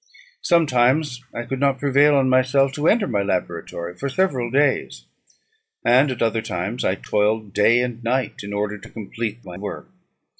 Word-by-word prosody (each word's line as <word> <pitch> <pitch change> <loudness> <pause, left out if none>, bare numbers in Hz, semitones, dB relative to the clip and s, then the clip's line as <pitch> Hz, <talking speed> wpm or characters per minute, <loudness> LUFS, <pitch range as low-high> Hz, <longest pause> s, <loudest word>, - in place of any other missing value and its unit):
Sometimes 135 -4 +2
I 120 - -5
could 130 +2 -5
not 140 -1 +2
prevail 145 +2 +3
on 135 -1 +3
myself 130 +1 +3
to 150 +3 -2
enter 220 -2 +3
my 105 -6 0
laboratory 90 -2 -3
for 140 +10 -4
several 135 -7 0
days; 140 +2 0 0.8
and 130 +4 +5
at 125 -2 -2
other 115 0 0
times 95 +5 -4
I 95 - +1
toiled 105 0 -1
day 115 +4 +4
and 120 -1 -4
night 125 0 -1
in 100 0 -7
order 105 0 -3
to - - -13
complete 115 +1 -6
my 90 -1 -9
work. 105 - -7
120 Hz, 165 wpm, -22 LUFS, 105-135 Hz, 0.8 s, and